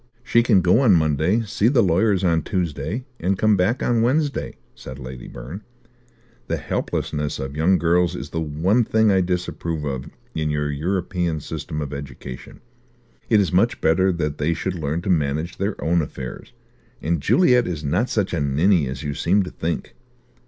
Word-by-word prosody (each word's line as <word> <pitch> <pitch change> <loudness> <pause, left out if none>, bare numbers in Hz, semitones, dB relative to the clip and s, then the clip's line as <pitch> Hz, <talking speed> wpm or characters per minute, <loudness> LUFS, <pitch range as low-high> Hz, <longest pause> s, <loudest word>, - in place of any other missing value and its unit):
"She 120 -2 +3
can 110 -5 +4
go 90 +6 +4
on 125 -7 +5
Monday, 80 +7 +2
see 105 0 0
the 120 -2 +4
lawyers 95 +2 +2
on 85 -3 +2
Tuesday, 90 - -3
and 95 +3 0
come 110 +1 +3
back 100 +7 +1
on 120 -2 +2
Wednesday," 140 +4 0 0.2
said 65 - -9
Lady 65 -2 -8
Byrne. 65 - -8 0.9
"The - - -1
helplessness 75 0 -2
of 65 +1 -5
young 85 +5 +3
girls 85 +2 +2
is - - -7
the 80 - -2
one 80 +10 +1
thing 110 -1 +3
I 95 -1 +3
disapprove 90 -3 -2
of 65 -3 -4 0.2
in 75 -1 -1
your 75 0 -1
European 85 +1 -1
system 75 +1 -5
of 70 -1 -5
education. 70 -3 -8 0.7
It 110 - +5
is 95 -5 +1
much 100 +6 +2
better 95 +4 +3
that 75 -3 -3
they 80 +3 +1
should 95 +4 -2
learn 80 0 -3
to 95 - 0
manage 80 +1 0
their 100 +1 -2
own 85 +1 +2
affairs; 65 -4 -7 0.5
and 80 -1 -1
Juliet 125 - +4
is 80 -4 -4
not 90 - 0
such 100 -4 -1
a 85 - 0
ninny 75 +3 +2
as 65 +1 -5
you 75 -1 -2
seem 95 +7 +2
to 90 - -7
think." 85 0 -4
85 Hz, 180 wpm, -22 LUFS, 75-100 Hz, 0.9 s, on